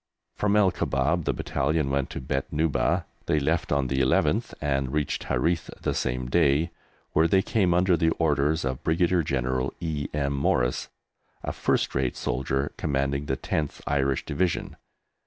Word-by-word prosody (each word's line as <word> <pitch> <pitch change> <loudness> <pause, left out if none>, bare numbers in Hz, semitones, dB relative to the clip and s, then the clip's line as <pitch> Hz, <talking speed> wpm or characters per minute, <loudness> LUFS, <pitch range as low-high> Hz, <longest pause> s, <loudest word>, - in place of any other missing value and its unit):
From 105 0 +1
El 100 -3 +5
Kubab 75 +5 0
the - - +2
Battalion 70 0 0
went 70 -1 0
to - - -5
Beit 65 +1 -3
Nuba. 80 0 +1 0.2
They 75 - +2
left 70 - 0
on 70 -2 +2
the 65 +1 -1
11th, 65 -1 +2
and 70 -2 -1
reached 75 -1 -1
Harith 85 -1 0
the - - -1
same 60 0 -1
day, 80 +3 +2 0.4
where 80 +2 +4
they 95 +2 +3
came 100 -5 +1
under 90 +1 +4
the 80 0 +2
orders 75 -1 +1
of 65 -1 -3
Brigadier 85 +2 +2
General 65 -2 -1
E. 75 -4 -2
M. 70 -2 -1
Morris, 65 -2 0 0.5
a - - -3
first - - 0
rate 65 -2 -1
soldier 65 +3 -1
commanding 70 0 -1
the 65 - -1
10th 75 +1 -2
Irish 70 -2 0
Division. 85 +4 -1
70 Hz, 160 wpm, -26 LUFS, 65-80 Hz, 0.5 s, El